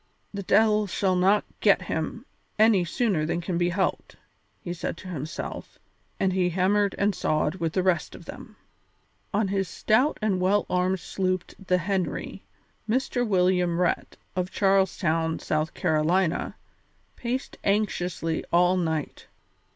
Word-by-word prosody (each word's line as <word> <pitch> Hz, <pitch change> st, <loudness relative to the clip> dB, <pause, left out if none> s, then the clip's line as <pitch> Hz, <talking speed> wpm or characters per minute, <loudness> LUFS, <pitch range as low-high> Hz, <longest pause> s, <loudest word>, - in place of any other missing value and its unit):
"The 200 Hz, -, -4 dB
de'il 210 Hz, +1 st, +3 dB
shall 190 Hz, 0 st, 0 dB
not 195 Hz, +3 st, +3 dB
get 200 Hz, -3 st, +4 dB
him 170 Hz, +8 st, -4 dB, 0.3 s
any 215 Hz, -4 st, +5 dB
sooner 185 Hz, -2 st, 0 dB
than 165 Hz, +2 st, -1 dB
can 175 Hz, 0 st, -2 dB
be 175 Hz, 0 st, +2 dB
helped," 190 Hz, +2 st, -2 dB, 0.4 s
he 175 Hz, -, -5 dB
said 170 Hz, -, -4 dB
to 185 Hz, -, -10 dB
himself, 155 Hz, -2 st, -6 dB, 0.4 s
and 190 Hz, -1 st, +1 dB
he 180 Hz, -1 st, +2 dB
hammered 195 Hz, +3 st, +1 dB
and 205 Hz, 0 st, +2 dB
sawed 155 Hz, -3 st, 0 dB
with 165 Hz, -2 st, -2 dB
the 185 Hz, -, +1 dB
rest 185 Hz, -2 st, 0 dB
of -, -, -12 dB
them. -, -, -10 dB, 0.8 s
On 205 Hz, -1 st, +1 dB
his 195 Hz, -1 st, 0 dB
stout 250 Hz, +8 st, +2 dB
and 200 Hz, -4 st, 0 dB
well 200 Hz, +3 st, +2 dB
armed 180 Hz, +1 st, +1 dB
sloop 185 Hz, -1 st, -2 dB, 0.2 s
the 180 Hz, -, +3 dB
Henry, 185 Hz, 0 st, -2 dB, 0.5 s
Mr. 245 Hz, 0 st, 0 dB
William 180 Hz, -3 st, +2 dB
Rhett, 180 Hz, -1 st, -1 dB, 0.2 s
of 180 Hz, 0 st, -1 dB
Charles 195 Hz, -1 st, +2 dB
Town, 160 Hz, -2 st, 0 dB
South 155 Hz, +2 st, -2 dB
Carolina, 165 Hz, +2 st, +1 dB, 0.6 s
paced 250 Hz, +2 st, -4 dB
anxiously 180 Hz, -5 st, 0 dB
all 180 Hz, +2 st, +4 dB
night. 160 Hz, -4 st, -3 dB
185 Hz, 145 wpm, -26 LUFS, 175-200 Hz, 0.8 s, any